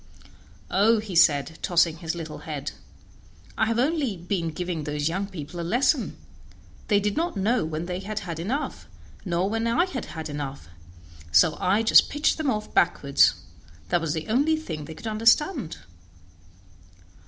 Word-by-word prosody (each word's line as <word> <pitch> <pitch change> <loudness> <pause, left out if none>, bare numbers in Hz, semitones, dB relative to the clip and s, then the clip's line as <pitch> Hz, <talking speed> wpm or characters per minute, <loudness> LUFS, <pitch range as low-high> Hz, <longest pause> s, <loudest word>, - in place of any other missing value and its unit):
"Oh!" 220 +4 +4
said 170 -9 +3
he, 160 - -15
tossing 170 -2 +2
his 165 0 -4
little 165 -2 -7
head, - - -5 0.8
"I 220 - +1
have 230 0 0
only 270 - 0
been 170 -1 -2
giving 175 -1 -4
those 150 0 -2
young 190 +4 -2
people 175 -2 -8
a - - -2
lesson; 245 - +1 0.7
they 205 -2 +4
did 205 0 -1
not 335 -7 -1
know 220 +4 +1
when 160 +1 -4
they 180 0 -4
had 205 +2 -6
had 170 -3 -6
enough, 255 - -3 0.4
nor 180 +1 0
when 225 +2 -1
I 235 +10 +3
had 275 -10 -5
had 160 -1 -6
enough, 140 - -6 0.6
so 120 - +5
I 200 +5 +2
just 225 - +6
pitched 295 +2 +1
them 305 -3 0
off 215 -3 -3
backward; 140 -4 +2 0.7
that 175 - +2
was 160 -2 -1
the 160 +3 -4
only 280 +8 +2
thing 160 - -6
they 160 - -9
could - - -12
understand." 230 - +2
190 Hz, 165 wpm, -25 LUFS, 160-230 Hz, 0.8 s, just